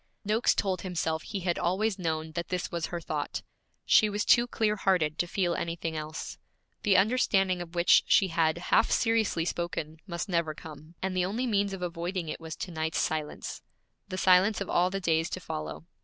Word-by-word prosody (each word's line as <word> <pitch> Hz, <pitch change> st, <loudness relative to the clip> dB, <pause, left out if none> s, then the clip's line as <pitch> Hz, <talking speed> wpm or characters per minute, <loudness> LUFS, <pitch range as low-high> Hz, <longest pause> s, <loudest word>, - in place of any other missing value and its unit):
Noakes 215 Hz, +3 st, +2 dB
told 190 Hz, -3 st, 0 dB
himself 160 Hz, -3 st, -2 dB
he 200 Hz, +2 st, -5 dB
had 175 Hz, -1 st, -1 dB
always 190 Hz, +4 st, 0 dB
known 160 Hz, -2 st, -2 dB
that 170 Hz, +1 st, -4 dB
this 180 Hz, -1 st, -3 dB
was 170 Hz, -1 st, -2 dB
her 175 Hz, -, -4 dB
thought; -, -, -4 dB, 0.4 s
she 215 Hz, -, +5 dB
was 205 Hz, 0 st, -1 dB
too 240 Hz, 0 st, +5 dB
clear 215 Hz, -3 st, +1 dB
hearted 180 Hz, -6 st, +1 dB
to 175 Hz, -, +1 dB
feel 175 Hz, -1 st, 0 dB
anything 165 Hz, -1 st, -3 dB
else. 155 Hz, 0 st, -6 dB, 0.4 s
The 200 Hz, -2 st, +4 dB
understanding 195 Hz, -4 st, +2 dB
of 175 Hz, 0 st, -9 dB
which 170 Hz, 0 st, +6 dB
she 195 Hz, -3 st, +4 dB
had 165 Hz, -1 st, +2 dB, 0.2 s
half 225 Hz, -, +5 dB
seriously 225 Hz, -8 st, +1 dB
spoken 170 Hz, -3 st, -3 dB
must 170 Hz, +1 st, -4 dB
never 170 Hz, -4 st, 0 dB
come, 155 Hz, +1 st, -11 dB
and 190 Hz, -1 st, -1 dB
the 180 Hz, -1 st, +2 dB
only 220 Hz, +7 st, -2 dB
means 200 Hz, -4 st, +1 dB
of 190 Hz, -2 st, -5 dB
avoiding 175 Hz, 0 st, -3 dB
it -, -, -5 dB
was 160 Hz, -1 st, -6 dB
to 185 Hz, -, -6 dB
night's 160 Hz, -1 st, -2 dB
silence, 155 Hz, -1 st, -2 dB, 0.5 s
the 185 Hz, -1 st, -5 dB
silence 185 Hz, +3 st, +4 dB
of 200 Hz, -, -4 dB
all 180 Hz, +1 st, +3 dB
the 195 Hz, +1 st, -3 dB
days 165 Hz, -3 st, +1 dB
to -, -, -4 dB
follow. 160 Hz, -2 st, -6 dB
180 Hz, 195 wpm, -29 LUFS, 165-195 Hz, 0.5 s, which